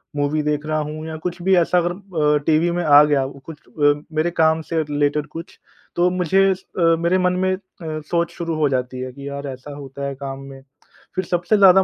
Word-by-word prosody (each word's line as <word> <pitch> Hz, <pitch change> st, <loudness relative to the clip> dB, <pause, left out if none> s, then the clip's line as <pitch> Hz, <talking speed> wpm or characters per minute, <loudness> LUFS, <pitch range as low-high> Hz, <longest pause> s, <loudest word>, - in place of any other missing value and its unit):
Movie 145 Hz, +1 st, 0 dB
देख 150 Hz, 0 st, -1 dB
रहा 155 Hz, 0 st, -1 dB
हूँ 155 Hz, +1 st, -6 dB
या 160 Hz, -, -5 dB
कुछ 175 Hz, 0 st, -3 dB
भी 190 Hz, +1 st, +3 dB
ऐसा 175 Hz, +1 st, +3 dB
अगर 175 Hz, 0 st, +2 dB
अ, 165 Hz, -6 st, 0 dB
टीवी 160 Hz, +2 st, +3 dB
में 175 Hz, 0 st, -1 dB
आ 145 Hz, -1 st, +8 dB
गया 145 Hz, -3 st, +2 dB
कुछ 140 Hz, +3 st, -11 dB
अ, 145 Hz, -1 st, +3 dB, 0.2 s
मेरे 165 Hz, +3 st, +1 dB
काम 160 Hz, 0 st, +3 dB
से 160 Hz, -1 st, +2 dB
रिलेटेड 145 Hz, 0 st, 0 dB
कुछ 165 Hz, +3 st, -10 dB, 0.4 s
तो 175 Hz, +1 st, +3 dB
मुझे 185 Hz, +2 st, +2 dB
अ, -, -, +1 dB, 0.4 s
मेरे 170 Hz, +2 st, +2 dB
मन 180 Hz, 0 st, +2 dB
में 185 Hz, -, +2 dB
अ, -, -, -12 dB, 0.2 s
सोच 160 Hz, +2 st, -2 dB
शुरू 165 Hz, -2 st, -3 dB
हो 150 Hz, -2 st, +2 dB
जाती 125 Hz, -1 st, -2 dB
है 130 Hz, 0 st, -5 dB
कि 140 Hz, +1 st, -9 dB
यार 140 Hz, 0 st, -5 dB
ऐसा 135 Hz, +2 st, -8 dB
होता 140 Hz, 0 st, -7 dB
है 140 Hz, -, -4 dB
काम 135 Hz, 0 st, -6 dB
में। 135 Hz, 0 st, -11 dB, 0.5 s
फ़िर 185 Hz, -, -1 dB
सबसे 175 Hz, +5 st, +1 dB
ज़्यादा 190 Hz, -1 st, +7 dB
155 Hz, 220 wpm, -21 LUFS, 145-175 Hz, 0.5 s, आ